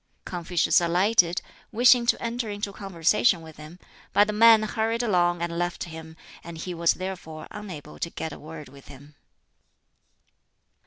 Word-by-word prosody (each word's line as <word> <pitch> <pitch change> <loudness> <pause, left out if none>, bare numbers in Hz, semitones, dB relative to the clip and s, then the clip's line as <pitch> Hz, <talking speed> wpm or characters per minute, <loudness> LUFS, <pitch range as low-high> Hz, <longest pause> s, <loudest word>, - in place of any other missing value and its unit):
Confucius 175 0 +1
alighted, 175 +1 +2 0.3
wishing 240 +1 +5
to - - +2
enter 235 -1 -3
into 205 -1 -4
conversation 195 0 +1
with 160 -1 -13
him; 155 +3 -11 0.4
but 205 - +5
the 210 - -3
man 225 0 +6
hurried 225 +2 -1
along 175 -5 +1
and 170 0 -3
left 175 0 -2
him, 160 -1 -10 0.3
and 170 -1 -9
he 180 +2 -5
was 170 0 +2
therefore 180 -4 -7
unable 165 -8 -9
to 170 - -3
get 160 -2 -6
a - - -10
word 155 -1 -10
with 140 +1 -16
him. 145 +2 -14
175 Hz, 155 wpm, -25 LUFS, 160-210 Hz, 0.4 s, man